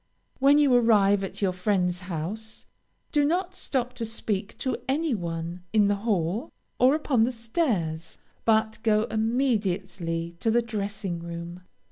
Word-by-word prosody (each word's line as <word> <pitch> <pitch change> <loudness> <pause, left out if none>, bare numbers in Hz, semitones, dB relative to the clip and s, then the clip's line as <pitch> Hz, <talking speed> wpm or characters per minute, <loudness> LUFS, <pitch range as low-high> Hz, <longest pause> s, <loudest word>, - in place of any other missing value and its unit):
When 280 +2 +6
you 290 -3 +4
arrive 205 -5 +4
at 195 - -5
your 185 -2 +2
friend's 180 -1 0
house, 190 +5 -6 0.5
do 295 -1 +3
not 355 +5 0
stop 255 -9 -2
to 235 - -3
speak 210 -3 -3
to 260 -2 -1
any 300 +1 +1
one 170 -2 -4
in 210 -2 +4
the 205 - +3
hall, 200 -1 -1 0.3
or 260 +3 +5
upon 275 -7 +2
the 240 - +2
stairs, 225 - -2 0.3
but 220 -1 +2
go 215 -1 +3
immediately 195 -8 -1
to 225 - 0
the 235 +1 +3
dressing 200 -5 -4
room. 170 +1 -7
215 Hz, 145 wpm, -26 LUFS, 180-240 Hz, 0.5 s, When